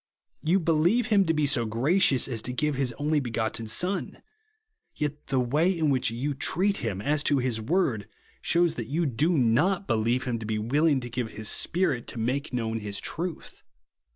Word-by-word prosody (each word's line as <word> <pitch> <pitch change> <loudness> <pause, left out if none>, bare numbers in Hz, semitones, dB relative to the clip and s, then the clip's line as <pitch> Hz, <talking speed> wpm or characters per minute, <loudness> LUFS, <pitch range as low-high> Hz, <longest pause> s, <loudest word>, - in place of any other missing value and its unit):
You 175 +5 +2
believe 170 +9 +2
him 200 -3 +4
to 165 - +1
be 150 -1 +1
so 135 -4 +2
gracious 135 - +2
as 120 -5 -1
to 125 - -3
give 150 +3 0
his 135 -2 0
only 150 +4 0
begotten 115 -3 -3
Son; 180 - -1 0.8
yet 150 -1 -4
the 135 -1 0
way 145 +8 +2
in 155 -3 +1
which 130 -4 +1
you 130 +6 -3
treat 190 +8 +1
him, 100 -3 -4
as 145 +1 +1
to 145 - +3
his 125 -4 -1
word 120 - 0 0.3
shews 170 -1 +2
that 110 - -7
you 160 +6 -1
do 150 +6 +1
not 150 - +2
believe 120 - 0
him 120 -4 -2
to 110 - -7
be 110 -1 -1
willing 140 +6 +1
to 120 - -7
give 120 -1 -3
his 110 0 -3
Spirit 170 -9 +1
to 120 - -6
make 130 +6 -2
known 115 -2 -2
his 105 -1 -4
truth. 170 0 -5
135 Hz, 190 wpm, -26 LUFS, 115-160 Hz, 0.8 s, him